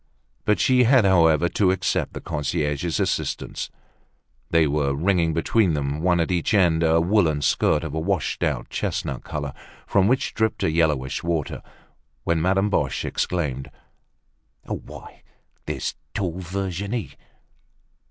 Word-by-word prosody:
But 105 - +2
she 125 -1 +4
had, 125 -2 +5
however, 85 -3 +4
to 95 0 +2
accept 95 - 0
the - - -6
concierge's 75 +1 -2
assistance. - - -2 0.8
They 80 -1 +4
were 70 -1 0
wringing 85 +1 +2
between 85 +2 +2
them, 70 +1 -2
one 85 0 +2
at 85 - 0
each 90 +4 +1
end, 85 -5 +3
a 80 0 +4
woolen 80 -5 +2
skirt 75 +3 +2
of 80 -3 -5
a 80 - -1
washed 90 0 -1
out - - -1
chestnut - - -3
color, 70 -2 -4 0.3
from 100 -1 +3
which 130 +3 +1
dribbled 110 -1 0
a - - +2
yellowish 75 -5 +1
water, 85 -4 -2 0.6
when 85 -1 +1
Madame 95 +4 +2
Boche - - 0
exclaimed: 70 -7 -2 0.9
"Why, - - -8 0.5
there's - - -2 0.2
tall 90 -3 -2
Virginie! 95 - -3
85 Hz, 135 wpm, -23 LUFS, 75-95 Hz, 0.9 s, had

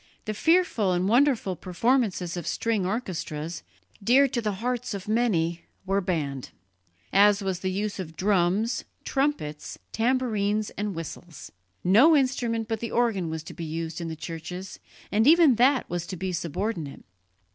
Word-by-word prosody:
The 215 - -2
fearful 320 - +2
and 180 +1 +1
wonderful 240 -5 +3
performances 185 - 0
of 175 -3 -5
string 220 -5 0
orchestras, 170 -7 -4 0.4
dear 265 +6 +5
to 245 -2 -1
the 210 -2 -1
hearts 245 +2 -3
of 195 -1 -7
many, 180 -7 +1 0.2
were 195 +1 +1
banned, 145 -8 -2 0.6
as 205 +1 +5
was 190 -2 -2
the 185 - -2
use 200 +2 -3
of 160 -3 -6
drums, 195 +4 +1 0.2
trumpets, 270 - -2
tambourines 220 -4 0
and 205 -2 -4
whistles. 165 0 -8 0.3
No 230 - +6
instrument 245 -5 0
but 225 -1 -2
the 230 - -4
organ 220 -8 +1
was 160 -1 -4
to - - -9
be 170 - -7
used 165 +1 -4
in 170 - -4
the 160 - -4
churches, 180 +4 -7 0.3
and 215 +5 +3
even 325 -3 +7
that 255 +2 +3
was 175 0 -4
to 190 - -5
be 185 +2 -3
subordinate. 170 -2 -4
200 Hz, 155 wpm, -26 LUFS, 175-235 Hz, 0.6 s, even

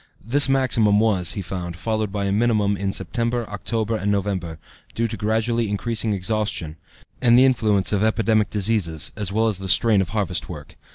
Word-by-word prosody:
This 135 +4 +5
maximum 115 -6 +2
was, 95 -6 +1
he 100 - -5
found, 90 -1 -5
followed 110 +1 -2
by 100 0 -2
a 100 - -1
minimum 105 -1 +1
in 100 0 -2
September, 115 +2 -2
October, 110 +2 -2
and 105 -1 -1
November, 95 -5 -2 0.4
due 115 +1 0
to 115 - -5
gradually 110 +2 -1
increasing 110 +2 -2
exhaustion, 100 -5 -2 0.4
and 120 -2 +5
the 130 - +6
influence 110 -7 +2
of 100 - +1
epidemic 110 -1 +1
diseases, 100 -7 -1
as 100 -3 -3
well 110 +2 +1
as 105 -4 -1
the 95 -1 -6
strain 105 0 +4
of 90 - -3
harvest 100 -4 -2
work. 75 -5 -10
105 Hz, 180 wpm, -22 LUFS, 95-115 Hz, 0.4 s, the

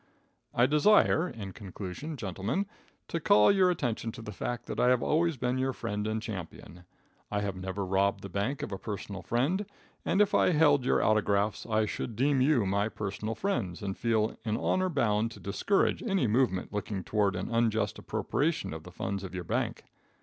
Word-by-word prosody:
I 120 - +4
desire, 160 +3 +4
in 100 -4 -7
conclusion, 105 - -7
gentlemen, 100 - -2 0.4
to 165 - -2
call 105 -8 +5
your 190 -2 +4
attention 120 -9 -1
to 115 - -9
the 105 - -6
fact 120 +5 -4
that - - -5
I 125 - +4
have 125 -1 +3
always 165 -1 +2
been 125 +1 -1
your 130 0 0
friend 105 -3 -3
and 110 0 -1
champion. 90 -5 -8 0.4
I 105 -1 -1
have 100 -2 -2
never 95 +1 -4
robbed 100 +1 +1
the - - -4
bank 100 +9 -2
of - - -5
a 95 - -4
personal 100 -2 -5
friend, 145 - 0 0.4
and 195 - +1
if 205 -1 +4
I 180 - +4
held 145 -4 +4
your - - +3
autographs 105 0 +1
I 110 -1 +2
should 110 +2 -4
deem 135 +3 +2
you 130 -5 +3
my 100 +2 +1
personal 105 +1 -4
friends, 110 - -2
and 95 -1 -2
feel 110 -1 +1
in 110 -1 -1
honor 185 0 +1
bound 115 -7 +1
to - - -12
discourage 100 - +1
any 195 - +1
movement 110 -5 +1
looking 100 -2 -3
toward 100 -2 +1
an 90 +6 -4
unjust 115 -1 +1
appropriation 155 - -1
of 80 - -6
the 90 - -12
funds 100 +2 -3
of 95 -1 -7
your 90 - -3
bank. - - -2
110 Hz, 190 wpm, -30 LUFS, 100-135 Hz, 0.4 s, call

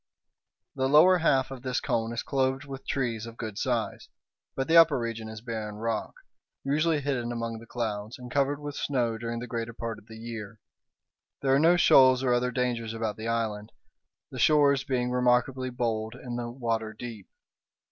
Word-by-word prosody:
The 130 0 0
lower 175 +6 +7
half 135 -5 +2
of 130 -2 -7
this 130 -1 -1
cone 115 0 -1
is 120 - -3
clothed 135 +1 0
with 135 -1 -9
trees 115 -4 -2
of 115 0 -10
good 110 -2 -5
size, 120 -4 -2 0.5
but 135 - -2
the 165 - +3
upper 165 -4 +7
region 115 -2 -4
is 110 -1 -8
barren 110 -3 -5
rock, 115 +1 -3 0.5
usually 155 +2 +1
hidden 130 -4 -2
among 115 -1 -4
the 115 - -14
clouds, 110 +1 -4
and 125 -1 -10
covered 140 +1 +1
with 145 0 -6
snow 120 -5 -1
during 115 0 -4
the 120 - -5
greater 115 -1 -4
part 115 -1 -5
of 110 - -23
the 110 - -11
year. 110 -2 -7 0.8
There 135 -1 +3
are 135 - +5
no 170 +3 +5
shoals 130 -5 +6
or 125 -2 +3
other 125 +1 +1
dangers 120 -2 -2
about 110 -2 -2
the 110 +1 -6
island, 110 -2 -2 0.6
the - - -7
shores 145 -3 +4
being 125 -2 -1
remarkably 125 +1 +2
bold 115 -2 -2
and 125 -1 -6
the 120 -1 -4
water 115 -3 -2
deep. 110 -5 -8
120 Hz, 185 wpm, -28 LUFS, 115-135 Hz, 0.8 s, lower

